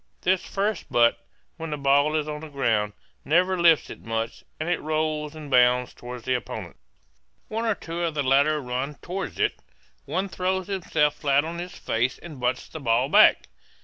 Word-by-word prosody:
This 185 Hz, 0 st, +2 dB
first 200 Hz, -1 st, -2 dB
butt, 115 Hz, 0 st, +3 dB, 0.3 s
when 165 Hz, -1 st, -5 dB
the 150 Hz, -, -3 dB
ball 145 Hz, +2 st, +3 dB
is 155 Hz, -1 st, 0 dB
on 150 Hz, 0 st, -4 dB
the 160 Hz, -, -8 dB
ground, 110 Hz, -7 st, 0 dB, 0.3 s
never 180 Hz, +6 st, +3 dB
lifts 170 Hz, -3 st, +4 dB
it -, -, -10 dB
much 115 Hz, 0 st, -3 dB, 0.2 s
and 155 Hz, -, -3 dB
it 175 Hz, -1 st, 0 dB
rolls 155 Hz, 0 st, -1 dB
and 150 Hz, -2 st, -9 dB
bounds 125 Hz, 0 st, +4 dB
toward 125 Hz, -1 st, -9 dB
the 130 Hz, -, 0 dB
opponents. 125 Hz, -, -5 dB, 0.7 s
One 225 Hz, +2 st, -2 dB
or 220 Hz, -2 st, +2 dB
two 165 Hz, -1 st, -6 dB
of 165 Hz, -2 st, -1 dB
the 145 Hz, -, 0 dB
latter 140 Hz, +3 st, +3 dB
run 130 Hz, +2 st, -3 dB
toward 190 Hz, +2 st, -5 dB
it; -, -, +1 dB, 0.5 s
one 185 Hz, +7 st, -1 dB
throws 185 Hz, 0 st, -1 dB
himself 160 Hz, -6 st, 0 dB
flat 145 Hz, 0 st, +2 dB
on 170 Hz, +1 st, -5 dB
his 180 Hz, +1 st, -6 dB
face 120 Hz, +3 st, -1 dB
and 155 Hz, -6 st, -10 dB
butts 125 Hz, 0 st, -1 dB
the 160 Hz, -, -8 dB
ball 125 Hz, 0 st, +1 dB
back. -, -, +6 dB
150 Hz, 185 wpm, -25 LUFS, 130-170 Hz, 0.7 s, back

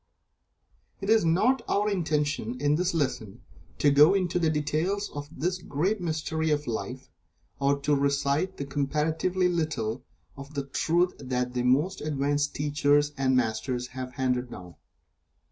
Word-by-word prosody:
It 200 Hz, +2 st, -1 dB
is 225 Hz, -3 st, +5 dB
not 215 Hz, +11 st, +3 dB
our 205 Hz, +1 st, +2 dB
intention, 150 Hz, -, -1 dB
in 145 Hz, +1 st, +2 dB
this 175 Hz, +3 st, 0 dB
lesson, 125 Hz, -9 st, -2 dB, 0.4 s
to 145 Hz, -, +4 dB
go 150 Hz, +6 st, +6 dB
into 180 Hz, -2 st, 0 dB
the 165 Hz, -2 st, +2 dB
details 160 Hz, +7 st, -1 dB
of 145 Hz, 0 st, -7 dB
this 180 Hz, +5 st, -2 dB
great 180 Hz, +7 st, -1 dB
mystery 160 Hz, -1 st, -1 dB
of 150 Hz, -1 st, 0 dB
Life, 115 Hz, -4 st, -5 dB, 0.5 s
or 140 Hz, 0 st, +2 dB
to 145 Hz, +1 st, +2 dB
recite 140 Hz, +5 st, 0 dB
the 140 Hz, -, -4 dB
comparatively 155 Hz, +6 st, 0 dB
little 135 Hz, -9 st, -2 dB, 0.3 s
of 140 Hz, +2 st, -11 dB
the 140 Hz, -1 st, -2 dB
Truth 170 Hz, +6 st, +1 dB
that 125 Hz, -2 st, -2 dB
the 125 Hz, -, -1 dB
most 140 Hz, +10 st, +1 dB
advanced 145 Hz, 0 st, -1 dB
teachers 145 Hz, 0 st, +2 dB
and 130 Hz, -1 st, +2 dB
Masters 120 Hz, +2 st, -1 dB
have 130 Hz, 0 st, -6 dB
handed 125 Hz, -1 st, -1 dB
down. 90 Hz, -6 st, -10 dB
145 Hz, 145 wpm, -27 LUFS, 135-165 Hz, 0.5 s, go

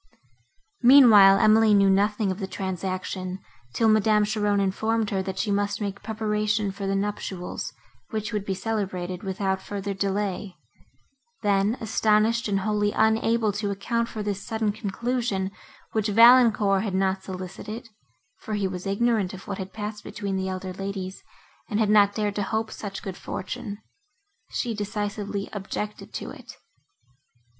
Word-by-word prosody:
Meanwhile, 230 Hz, -7 st, +8 dB
Emily 215 Hz, 0 st, +5 dB
knew 200 Hz, -1 st, +5 dB
nothing 205 Hz, +1 st, +2 dB
of 185 Hz, -, -5 dB
the 195 Hz, -, -3 dB
transaction, 185 Hz, -1 st, -4 dB, 0.4 s
till 225 Hz, -, +3 dB
Madame 215 Hz, -1 st, +4 dB
Cheron 205 Hz, -1 st, +1 dB
informed 220 Hz, +3 st, 0 dB
her, 195 Hz, -1 st, 0 dB
that 190 Hz, 0 st, -5 dB
she 210 Hz, -, -1 dB
must 205 Hz, 0 st, 0 dB
make 200 Hz, -2 st, -4 dB
preparation 210 Hz, -1 st, -1 dB
for 195 Hz, 0 st, -5 dB
the 195 Hz, -, 0 dB
nuptials, 195 Hz, -2 st, -3 dB, 0.4 s
which 215 Hz, 0 st, -3 dB
would 210 Hz, -2 st, -1 dB
be 195 Hz, -1 st, -2 dB
celebrated 185 Hz, -3 st, -3 dB
without 190 Hz, 0 st, -2 dB
further 200 Hz, 0 st, -4 dB
delay; 195 Hz, -1 st, -2 dB, 0.9 s
then, 205 Hz, +3 st, +2 dB
astonished 220 Hz, +1 st, +2 dB
and 195 Hz, -2 st, 0 dB
wholly 210 Hz, 0 st, +1 dB
unable 220 Hz, 0 st, +2 dB
to 205 Hz, 0 st, -3 dB
account 230 Hz, +4 st, -1 dB
for 215 Hz, -, -5 dB
this 205 Hz, -2 st, -3 dB
sudden 220 Hz, -2 st, -1 dB
conclusion, 215 Hz, -1 st, -2 dB, 0.4 s
which 220 Hz, -1 st, 0 dB
Valancourt 225 Hz, -3 st, +6 dB
had 200 Hz, -4 st, -2 dB
not 190 Hz, 0 st, +1 dB
solicited 190 Hz, +5 st, -7 dB, 0.5 s
(for 215 Hz, -, -4 dB
he 200 Hz, -2 st, 0 dB
was 185 Hz, 0 st, -5 dB
ignorant 200 Hz, -2 st, +1 dB
of 190 Hz, -, -12 dB
what 200 Hz, -1 st, -4 dB
had 190 Hz, 0 st, -5 dB
passed 210 Hz, 0 st, -6 dB
between 200 Hz, -3 st, -4 dB
the 190 Hz, 0 st, -1 dB
elder 185 Hz, 0 st, -5 dB
ladies, 195 Hz, 0 st, -5 dB, 0.5 s
and 210 Hz, -2 st, 0 dB
had 210 Hz, -2 st, +2 dB
not 205 Hz, -1 st, +5 dB
dared 210 Hz, -2 st, 0 dB
to 205 Hz, -, -2 dB
hope 220 Hz, +2 st, -2 dB
such 195 Hz, -2 st, -7 dB
good 195 Hz, -4 st, -5 dB
fortune), 210 Hz, +1 st, -5 dB, 0.7 s
she 240 Hz, -2 st, -2 dB
decisively 205 Hz, -1 st, -3 dB
objected 210 Hz, +1 st, -5 dB
to -, -, -5 dB
it. -, -, -12 dB
205 Hz, 150 wpm, -25 LUFS, 195-215 Hz, 0.9 s, Meanwhile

